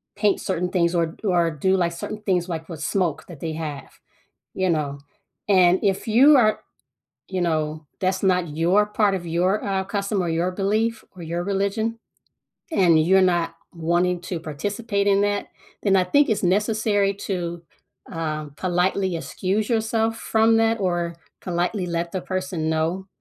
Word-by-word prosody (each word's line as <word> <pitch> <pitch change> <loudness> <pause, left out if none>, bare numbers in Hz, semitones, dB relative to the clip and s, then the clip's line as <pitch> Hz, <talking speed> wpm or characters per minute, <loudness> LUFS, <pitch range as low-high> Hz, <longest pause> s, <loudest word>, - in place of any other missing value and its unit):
paint 205 -2 +1
certain 180 -1 -1
things 175 -1 +1
or 170 -1 +2
d 160 - -14
or 175 -3 +2
do 190 +6 +1
like, 175 -2 +1
certain 210 +5 -6
things, 185 -3 0
like, 160 -1 -4
with 160 -3 -7
smoke 175 -6 -1
that 165 -6 -11
they 160 -2 -4
have, 150 -3 -6 0.6
you 185 -1 +1
know, 145 -3 -1 0.5
and 185 -2 +5
if 195 -2 0
you 270 +7 +7
are 215 -4 +3 0.7
you 190 -1 -2
know, 155 -2 -1
that's 190 0 0
not 180 -5 +1
your 180 +6 +3
part 210 -1 +1
of 175 -2 -5
your, 180 +5 0
uh, 195 -1 0
custom 200 0 -1
or 175 - -1
your 170 +3 0
belief 215 +4 0
or 175 - -9
your 170 +2 -3
religion, 200 +4 -1 0.7
and 170 - +4
you're 190 +4 +4
not 175 -2 +1 0.2
wanting 175 +1 0
to 180 -1 -4
participate 200 +7 -2
in 200 0 +4
that, 205 0 0 0.4
then 195 -2 +3
I 185 - +4
think 285 +11 +3
it's 215 - 0
necessary 205 +1 +1
to, 175 -4 -4 0.5
uh, 155 -2 -3
politely 185 +1 0
excuse 195 +6 -2
yourself 225 0 0
from 225 0 +3
that 225 0 +2
or 175 -3 -1 0.3
politely 180 +2 -1
let 170 0 -2
the 185 - -3
person 185 -4 -3
know, 165 +4 -1
185 Hz, 165 wpm, -23 LUFS, 170-200 Hz, 0.7 s, you